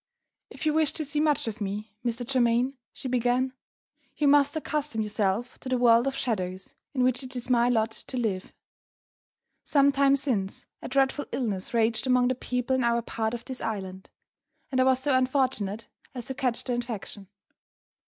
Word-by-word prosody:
"If -, -, -7 dB
you 305 Hz, -, +3 dB
wish 315 Hz, -2 st, +2 dB
to 310 Hz, -, -1 dB
see 295 Hz, +2 st, -2 dB
much 300 Hz, -5 st, +2 dB
of 220 Hz, 0 st, -5 dB
me, 205 Hz, +1 st, -4 dB
Mr. 240 Hz, 0 st, -2 dB
Germaine," 245 Hz, 0 st, +2 dB, 0.2 s
she -, -, -7 dB
began, 250 Hz, +1 st, +1 dB, 0.6 s
"you 295 Hz, -, +2 dB
must 285 Hz, 0 st, +5 dB
accustom 300 Hz, -7 st, -2 dB
yourself 210 Hz, +3 st, -1 dB
to 260 Hz, -, -7 dB
the 255 Hz, -, +2 dB
world 240 Hz, +1 st, +5 dB
of 270 Hz, -, -1 dB
shadows 185 Hz, -7 st, -3 dB, 0.2 s
in 255 Hz, -, +2 dB
which 255 Hz, +1 st, +2 dB
it 260 Hz, -1 st, -8 dB
is 245 Hz, +1 st, -4 dB
my 240 Hz, 0 st, +4 dB
lot 225 Hz, -2 st, +2 dB
to 255 Hz, -, -7 dB
live. 205 Hz, -6 st, -2 dB, 1.1 s
Some 280 Hz, -1 st, +4 dB
time 275 Hz, 0 st, +4 dB
since, 235 Hz, -9 st, -2 dB, 0.2 s
a -, -, -6 dB
dreadful 270 Hz, +2 st, +1 dB
illness 205 Hz, -7 st, -2 dB
raged 230 Hz, +2 st, +1 dB
among 250 Hz, -1 st, +4 dB
the -, -, +2 dB
people 250 Hz, +1 st, -1 dB
in 260 Hz, -, +1 dB
our 235 Hz, 0 st, +2 dB
part 225 Hz, 0 st, -2 dB
of 235 Hz, -, -8 dB
this 260 Hz, -2 st, -6 dB
island; 190 Hz, -4 st, -5 dB, 0.6 s
and 260 Hz, -1 st, +2 dB
I -, -, +4 dB
was 260 Hz, -1 st, +4 dB
so 270 Hz, 0 st, +2 dB
unfortunate 255 Hz, -6 st, 0 dB, 0.3 s
as 245 Hz, -2 st, -5 dB
to 265 Hz, -, -4 dB
catch 255 Hz, -3 st, -1 dB
the 250 Hz, -, -2 dB
infection. 225 Hz, -4 st, -5 dB
245 Hz, 180 wpm, -27 LUFS, 225-265 Hz, 1.1 s, must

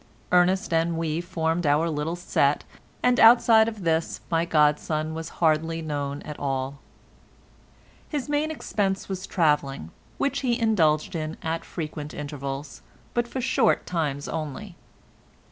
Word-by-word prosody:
Ernest 180 Hz, 0 st, +3 dB
and 165 Hz, 0 st, +1 dB
we 165 Hz, 0 st, -1 dB
formed 170 Hz, -2 st, -1 dB
our 150 Hz, +3 st, +3 dB
little 155 Hz, +1 st, -2 dB
set, 150 Hz, -5 st, +1 dB, 0.4 s
and 250 Hz, 0 st, +3 dB
outside 225 Hz, -1 st, +7 dB
of 215 Hz, -4 st, -5 dB
this 165 Hz, -1 st, 0 dB
my 165 Hz, 0 st, +2 dB
godson 155 Hz, 0 st, +1 dB
was 165 Hz, +1 st, -5 dB
hardly 160 Hz, 0 st, +2 dB
known 145 Hz, -2 st, -3 dB
at 150 Hz, -1 st, -8 dB
all. 135 Hz, 0 st, -2 dB, 1.3 s
His 295 Hz, -3 st, -3 dB
main 295 Hz, +1 st, 0 dB
expense 200 Hz, -10 st, -2 dB
was 190 Hz, -1 st, -5 dB
travelling, 145 Hz, -, 0 dB, 0.3 s
which 280 Hz, -, 0 dB
he 245 Hz, -3 st, 0 dB
indulged 170 Hz, -10 st, +2 dB
in 155 Hz, 0 st, -3 dB
at 165 Hz, +1 st, -2 dB
frequent 150 Hz, -2 st, -6 dB
intervals, 140 Hz, -1 st, -6 dB, 0.3 s
but 240 Hz, 0 st, 0 dB
for 260 Hz, +2 st, -4 dB
short 255 Hz, -2 st, +2 dB
times 145 Hz, -5 st, -2 dB
only. 165 Hz, +5 st, -5 dB
165 Hz, 135 wpm, -25 LUFS, 150-195 Hz, 1.3 s, outside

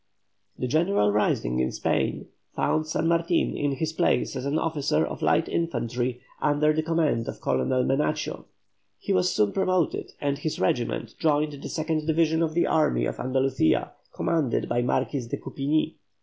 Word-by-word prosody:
The -, -, -2 dB
general 155 Hz, -, +2 dB
rising 65 Hz, -11 st, +1 dB
in 65 Hz, 0 st, +1 dB
Spain -, -, -1 dB, 0.3 s
found 155 Hz, 0 st, 0 dB
San 155 Hz, +1 st, 0 dB
Martin 170 Hz, +1 st, +1 dB
in 145 Hz, -1 st, 0 dB
his 155 Hz, +4 st, -2 dB
place 130 Hz, -4 st, +1 dB
as 130 Hz, +1 st, -3 dB
an 145 Hz, +2 st, 0 dB
officer 145 Hz, -, +1 dB
of -, -, -6 dB
light -, -, +2 dB
infantry 125 Hz, -5 st, -2 dB, 0.2 s
under 150 Hz, +1 st, +3 dB
the 155 Hz, -, +1 dB
command 155 Hz, -7 st, 0 dB
of -, -, -6 dB
Colonel 65 Hz, -, +1 dB
Menacho. 150 Hz, +3 st, -1 dB, 0.5 s
He 195 Hz, -, -2 dB
was 180 Hz, -1 st, +2 dB
soon 105 Hz, -1 st, +2 dB
promoted, 185 Hz, -4 st, 0 dB
and 140 Hz, -1 st, -1 dB
his 155 Hz, +1 st, -3 dB
regiment 115 Hz, +3 st, -1 dB
joined 150 Hz, -1 st, +2 dB
the -, -, -6 dB
second 155 Hz, -1 st, -2 dB
division 160 Hz, 0 st, +2 dB
of 160 Hz, -1 st, 0 dB
the 170 Hz, -, +3 dB
army -, -, +2 dB
of -, -, -4 dB
Andalucia, 130 Hz, -8 st, +1 dB, 0.2 s
commanded 155 Hz, -8 st, 0 dB
by 120 Hz, -, +1 dB
the 120 Hz, -, -1 dB
Marquis 135 Hz, -1 st, 0 dB
of -, -, -2 dB
Coupigni. 145 Hz, +3 st, -1 dB
145 Hz, 165 wpm, -26 LUFS, 125-160 Hz, 0.5 s, under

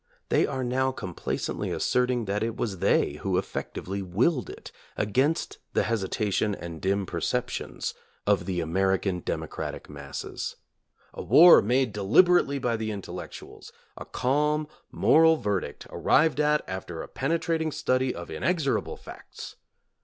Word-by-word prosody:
They -, -, +3 dB
are 130 Hz, -1 st, -3 dB
now 130 Hz, +2 st, +1 dB
complacently 95 Hz, -9 st, -4 dB
asserting 125 Hz, -2 st, +1 dB
that 100 Hz, +1 st, -1 dB
it 115 Hz, 0 st, -2 dB
was 100 Hz, -6 st, -3 dB
they 85 Hz, -6 st, +2 dB
who 95 Hz, -2 st, 0 dB
effectively 95 Hz, +1 st, -4 dB
willed 120 Hz, -, 0 dB
it, -, -, -10 dB, 0.3 s
against 130 Hz, +10 st, 0 dB
the -, -, +2 dB
hesitation 105 Hz, -1 st, 0 dB
and 85 Hz, -3 st, -8 dB
dim 100 Hz, +1 st, 0 dB
perceptions -, -, -3 dB, 0.3 s
of 100 Hz, -2 st, +2 dB
the 90 Hz, -2 st, -1 dB
American 95 Hz, +2 st, 0 dB
democratic -, -, -5 dB
masses. 70 Hz, -1 st, -6 dB, 0.6 s
A -, -, -6 dB
war 150 Hz, -, +8 dB
made 125 Hz, +1 st, +1 dB
de 105 Hz, -, -4 dB
liberately 140 Hz, -, +4 dB
by 120 Hz, -3 st, 0 dB
the 110 Hz, 0 st, -3 dB
intellectuals! 100 Hz, -3 st, -8 dB, 0.2 s
A -, -, -8 dB
calm 150 Hz, +3 st, 0 dB, 0.2 s
moral 160 Hz, 0 st, +5 dB
verdict, 100 Hz, -, -3 dB
arrived 160 Hz, -1 st, +3 dB
at 150 Hz, 0 st, +2 dB
after 95 Hz, -3 st, -5 dB
a -, -, -9 dB
penetrating 160 Hz, +2 st, -1 dB
study 130 Hz, -2 st, 0 dB
of 85 Hz, 0 st, -8 dB
inexorable 140 Hz, -, -1 dB
facts! -, -, -11 dB
110 Hz, 135 wpm, -27 LUFS, 95-140 Hz, 0.6 s, war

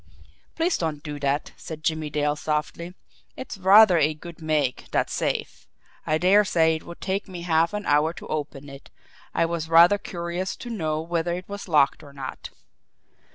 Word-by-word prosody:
"Please 330 Hz, +1 st, 0 dB
don't 155 Hz, -3 st, -3 dB
do 150 Hz, -1 st, -6 dB
that," 140 Hz, +1 st, -1 dB
said 155 Hz, -1 st, -9 dB
Jimmie 155 Hz, -1 st, -1 dB
Dale 150 Hz, 0 st, 0 dB
softly. 155 Hz, +4 st, -3 dB, 0.4 s
"It's 260 Hz, -, -7 dB
rather 190 Hz, -1 st, +7 dB
a 155 Hz, 0 st, +2 dB
good 170 Hz, +2 st, -11 dB
make, 150 Hz, -5 st, -1 dB
that -, -, 0 dB
safe. -, -, -3 dB, 0.4 s
I 155 Hz, -, +2 dB
dare 190 Hz, +5 st, +5 dB
say 160 Hz, -4 st, +2 dB
it -, -, -13 dB
would 170 Hz, -, -10 dB
take 195 Hz, +1 st, -2 dB
me 180 Hz, -3 st, -8 dB
half 165 Hz, -1 st, +2 dB
an 210 Hz, 0 st, -4 dB
hour 150 Hz, +2 st, +3 dB
to -, -, -10 dB
open 145 Hz, -2 st, -5 dB
it. 140 Hz, -1 st, -12 dB, 0.5 s
I 165 Hz, -, +3 dB
was 165 Hz, -1 st, -3 dB
rather 170 Hz, +5 st, +6 dB
curious 175 Hz, +1 st, -4 dB
to 240 Hz, -, -8 dB
know 155 Hz, -7 st, -2 dB
whether 170 Hz, +1 st, -1 dB
it 180 Hz, +1 st, -8 dB
was 200 Hz, 0 st, -7 dB
locked 150 Hz, -4 st, +3 dB
or 145 Hz, -2 st, -14 dB
not." 135 Hz, -2 st, -7 dB
165 Hz, 180 wpm, -24 LUFS, 150-180 Hz, 0.5 s, rather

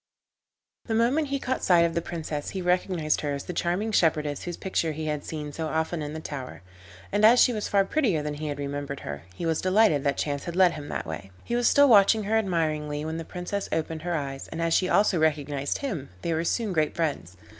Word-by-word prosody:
The 225 Hz, -, -1 dB
moment 255 Hz, +7 st, +2 dB
he 275 Hz, 0 st, -1 dB
caught 260 Hz, -1 st, -3 dB
sight 175 Hz, -2 st, +5 dB
of 165 Hz, -, -1 dB
the 170 Hz, -, 0 dB
Princess 155 Hz, -3 st, -4 dB
he 190 Hz, -, -4 dB
recognised 180 Hz, -3 st, +1 dB
her 145 Hz, -1 st, -1 dB
as 140 Hz, -, -6 dB
the 180 Hz, -, -6 dB
charming 180 Hz, +6 st, -1 dB
shepherdess 150 Hz, -6 st, +1 dB
whose 175 Hz, -1 st, -5 dB
picture 165 Hz, -4 st, -1 dB
he 155 Hz, +1 st, -5 dB
had 150 Hz, -1 st, -2 dB
seen 150 Hz, -2 st, -6 dB
so 160 Hz, +1 st, -3 dB
often 160 Hz, +1 st, -1 dB
in 150 Hz, 0 st, -5 dB
the 160 Hz, -, -5 dB
tower, 135 Hz, -, -7 dB, 0.5 s
and 205 Hz, +1 st, +1 dB
as 235 Hz, +3 st, +7 dB
she 245 Hz, -, +5 dB
was 210 Hz, -2 st, -2 dB
far 200 Hz, -1 st, +3 dB
prettier 200 Hz, -, +1 dB
than 150 Hz, 0 st, -3 dB
he 155 Hz, +1 st, -5 dB
had 145 Hz, -1 st, -3 dB
remembered 140 Hz, 0 st, -4 dB
her, 70 Hz, +2 st, -7 dB
he 170 Hz, -, -4 dB
was 160 Hz, -1 st, 0 dB
delighted 185 Hz, -6 st, +3 dB
that 140 Hz, -2 st, 0 dB
chance 145 Hz, -1 st, -2 dB
had 170 Hz, -, -5 dB
led 185 Hz, -1 st, +5 dB
him 150 Hz, -3 st, -7 dB
that -, -, -3 dB
way. 80 Hz, +4 st, -6 dB
He 240 Hz, -, -2 dB
was 240 Hz, 0 st, +2 dB
still 285 Hz, 0 st, +6 dB
watching 215 Hz, -1 st, +6 dB
her 210 Hz, +2 st, 0 dB
admiringly 155 Hz, -6 st, -1 dB
when 160 Hz, +1 st, -3 dB
the 165 Hz, -, -4 dB
Princess 180 Hz, +4 st, -4 dB
opened 160 Hz, 0 st, -2 dB
her 175 Hz, +1 st, -2 dB
eyes, 135 Hz, -3 st, -4 dB
and 160 Hz, -, -7 dB
as 165 Hz, 0 st, +1 dB
she 185 Hz, +1 st, +2 dB
also 200 Hz, -4 st, +3 dB
recognised 145 Hz, -3 st, 0 dB
him 185 Hz, -, -4 dB
they 170 Hz, -, 0 dB
were 160 Hz, +1 st, 0 dB
soon 215 Hz, +1 st, 0 dB
great 155 Hz, -2 st, +1 dB
friends. 140 Hz, -, -2 dB
165 Hz, 235 wpm, -26 LUFS, 150-195 Hz, 0.5 s, as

